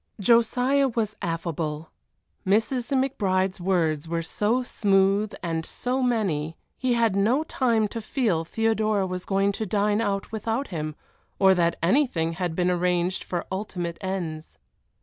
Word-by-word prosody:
Josiah 245 +5 +3
was 220 -4 -2
affable. 165 -2 -3 0.5
Mrs. 225 +5 +1
McBride's 195 -9 0
words 165 -5 0
were 165 0 -2
so 220 +9 0
smooth 200 -2 +2
and 165 -2 -2
so 250 +9 -2
many, 185 -11 0 0.2
he 255 -2 0
had 230 -4 +2
no 230 +9 +2
time 235 -8 +1
to 230 - -5
feel 215 - 0
Theodora 215 +1 +1
was 185 -1 -5
going 195 0 +2
to 215 +2 -3
dine 210 +2 +1
out 200 -2 -2
without 225 +5 -2
him, 155 -4 -4 0.4
or 190 -1 +6
that 170 -2 +1
anything 170 - +2
had 175 -1 -3
been 180 0 +2
arranged 180 0 0
for 175 -2 -3
ultimate 180 -3 -4
ends. 165 - -4
195 Hz, 140 wpm, -25 LUFS, 170-225 Hz, 0.5 s, or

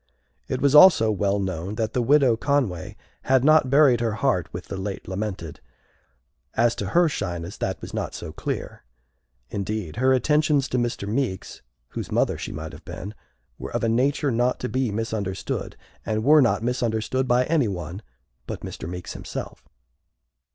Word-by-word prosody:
It 130 - -2
was 140 -1 +3
also 150 -9 +8
well 100 -1 +1
known 95 0 -3
that 110 0 -2
the 125 - +1
Widow 135 -1 +4
Conway 125 - -1 0.3
had 130 -1 +3
not 155 -2 +5
buried 135 -3 +5
her 115 -2 0
heart 110 -6 0
with 90 - -7
the - - -6
late 95 0 -5
lamented. 95 -5 -4 1.0
As 115 +1 +3
to 100 - -3
her 175 - +4
shyness, 90 - -4
that - - -3
was - - -8
not - - -3
so - - -7
clear. - - -5 0.7
Indeed, 100 -3 -4
her 130 +2 +3
attentions 150 +1 +2
to 125 - 0
Mr. 120 -4 -2
Meeks, 110 -4 -3 0.3
whose - - -6
mother - - +2
she - - -6
might 80 0 -6
have - - -12
been, 100 +3 -7 0.5
were - - -6
of - - -1
a 115 - +2
nature 135 +4 +1
not 120 +2 +1
to 125 - -2
be 130 +1 0
misunderstood, 105 -3 -3 0.3
and 110 0 -1
were 150 +4 +6
not 120 -3 +2
misunderstood 120 +1 -1
by 125 +1 +3
anyone 100 - -1 0.5
but - - -5
Mr. 80 - -7
Meeks 90 0 -6
himself. - - -7
115 Hz, 165 wpm, -24 LUFS, 100-130 Hz, 1.0 s, also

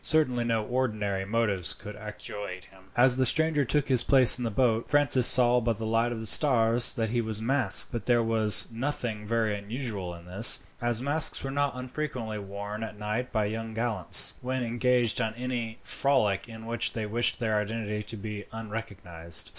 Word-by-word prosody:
Certainly 130 -7 +1
no 115 -2 -1
ordinary 105 -6 -2
motives 100 -4 -1
could 105 0 -10
actuate 105 -3 -8
him. 95 0 -20
As 125 +1 +5
the 130 - +2
stranger 160 +1 +1
took 145 +3 0
his 130 -3 +2
place 130 -2 +5
in - - -4
the 115 - -1
boat, 115 0 0
Francis 140 -4 +3
saw 125 -1 +5
by 115 -1 -1
the 110 +1 -6
light 115 +2 0
of 115 - -5
the 110 - -6
stars 115 -1 +4
that 110 -3 -2
he 120 0 0
was 110 -2 -4
masked; 125 -2 +1
but 120 -3 -6
there 120 -2 +3
was 110 -2 +4
nothing 115 -4 -4
very 110 -2 0
unusual 100 -4 -6
in 85 0 -14
this, 95 +6 +7 0.2
as 120 0 -1
masks 150 +3 +2
were 135 - -4
not 140 -1 -2
unfrequently 125 -4 -5
worn 100 +2 -7
at 110 -1 -8
night 105 +4 -4
by 110 -3 0
young 110 +1 -5
gallants, 115 -5 +2
when 130 0 -3
engaged 120 0 +1
on 110 -1 -3
any 120 -2 -5
frolic 120 -7 0
in 110 0 -11
which 115 +1 -2
they 110 -2 -4
wished 115 +3 -1
their 110 -3 -1
identity 105 0 -4
to 110 +2 -5
be 105 0 -7
unrecognized. 100 -7 -5
115 Hz, 185 wpm, -27 LUFS, 105-125 Hz, 0.2 s, this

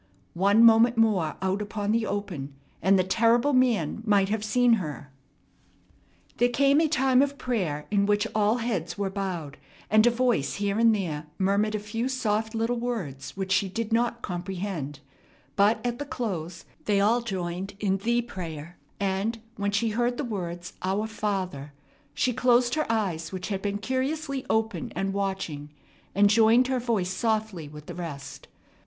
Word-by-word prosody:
One 200 +5 +4
moment 230 +1 +6
more 205 -9 +2
out 190 +2 0
upon 205 0 -2
the 225 -1 +1
open, 170 -10 -4 0.3
and 195 +3 +4
the 185 - +3
terrible 230 +8 +3
man 230 - +2
might 200 -3 +3
have 215 0 -1
seen 245 +2 +3
her. 145 -3 -7 1.3
There 245 - +3
came 280 +4 +4
a 325 - +3
time 265 -3 +3
of 280 0 0
prayer 180 - -2
in 200 -1 +2
which 205 +1 +2
all 215 +2 +2
heads 210 -9 -3
were 200 -1 -2
bowed, 180 -7 -4 0.3
and 215 +2 +6
a - - +8
voice 240 - +1
here 200 +1 -1
and 230 -1 +5
there 155 -6 -3
murmured 200 +3 +1
a - - +1
few 225 +4 -3
soft 220 -3 -1
little 230 +2 0
words 190 - -4
which 190 -1 -3
she 190 0 +2
did 225 +3 -3
not 235 0 0
comprehend; 175 -6 -4 0.5
but 210 +2 +4
at 240 0 -2
the 290 - -3
close 180 - -4 0.2
they 205 -2 +2
all 225 +4 +3
joined 190 -3 -4
in 195 -2 +1
"the 235 +4 0
prayer"; 170 -6 -7 0.2
and, 200 +3 -1 0.2
when 200 0 -1
she 205 +3 +1
heard 240 +3 0
the - - -2
words, 175 -5 -5
"Our 195 +3 0
Father," 190 -10 -3 0.4
she 250 - +1
closed 245 0 +3
her 310 -6 0
eyes, 180 -8 -1
which 185 0 -5
had 195 -2 -2
been 205 0 -1
curiously 265 +4 -2
open 225 +2 -1
and 195 0 -1
watching, 190 -7 -3 0.5
and 205 +1 +6
joined 225 +4 +5
her 260 -1 +1
voice 220 -7 -1
softly 215 -5 -1
with 150 0 -11
the 175 - -7
rest. 140 -5 -7
205 Hz, 170 wpm, -26 LUFS, 185-235 Hz, 1.3 s, a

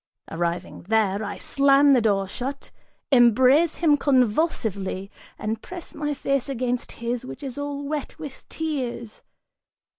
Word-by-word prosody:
Arriving 170 +1 -3
there, 215 -2 +2
I 205 -1 -5
slam 280 0 +4
the 250 - +4
door 200 -3 +1
shut, 265 +7 -6 0.4
embrace 260 +6 +5
him 305 -4 +3
convulsively, 220 - 0 0.3
and 220 +1 -3
press 360 -2 -9
my 295 -1 -2
face 275 -1 -1
against 250 -2 -2
his 235 +1 -3
which 255 +2 -9
is 265 -3 -5
all 285 0 -4
wet 290 0 -4
with 295 -4 -9
tears. 255 -8 -4
255 Hz, 130 wpm, -24 LUFS, 220-285 Hz, 0.4 s, embrace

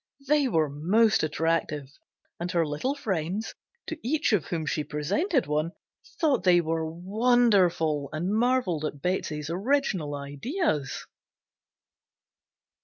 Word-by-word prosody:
They 290 -1 +3
were 160 -10 +2
most 190 +10 +2
attractive, 155 -2 -1 0.5
and 175 +1 -3
her 170 -2 +2
little 155 - -2
friends, 195 - -2 0.3
to 325 - -6
each 290 0 +1
of 180 -9 +2
whom 165 -3 -3
she 155 0 -1
presented 255 - 0
one, 155 +3 -1 0.5
thought 295 - +2
they 180 -2 +5
were 160 -1 -1
wonderful, 185 - +2
and 170 +6 -2
marvelled 230 -8 +1
at 150 -2 -3
Betsey's 155 -3 -2
original 190 - 0
ideas. 145 - -2
175 Hz, 115 wpm, -27 LUFS, 155-240 Hz, 0.5 s, they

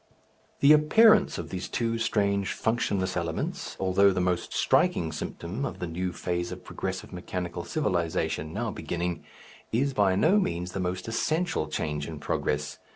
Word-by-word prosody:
The 140 +2 +8
appearance 215 +9 +5
of - - -5
these 95 -1 -4
two 115 -1 -1
strange 100 -3 +1
functionless 105 -5 0
elements, 85 -2 -3
although 95 +1 +4
the 95 - -1
most 90 -1 0
striking 80 -1 +2
symptom 85 - -5
of - - -3
the 90 - -3
new 90 +2 -3
phase 90 0 -3
of - - -8
progressive - - -5
mechanical 90 -1 -4
civilization 85 - -1
now - - -2
beginning, 85 0 -3 0.5
is 135 +5 +1
by 100 -5 +3
no 170 - +4
means 90 - -2
the 95 - -4
most 90 +1 -2
essential 155 - 0
change 75 -1 -3
in 80 -2 -6
progress. 75 0 -2
90 Hz, 155 wpm, -27 LUFS, 85-115 Hz, 0.5 s, The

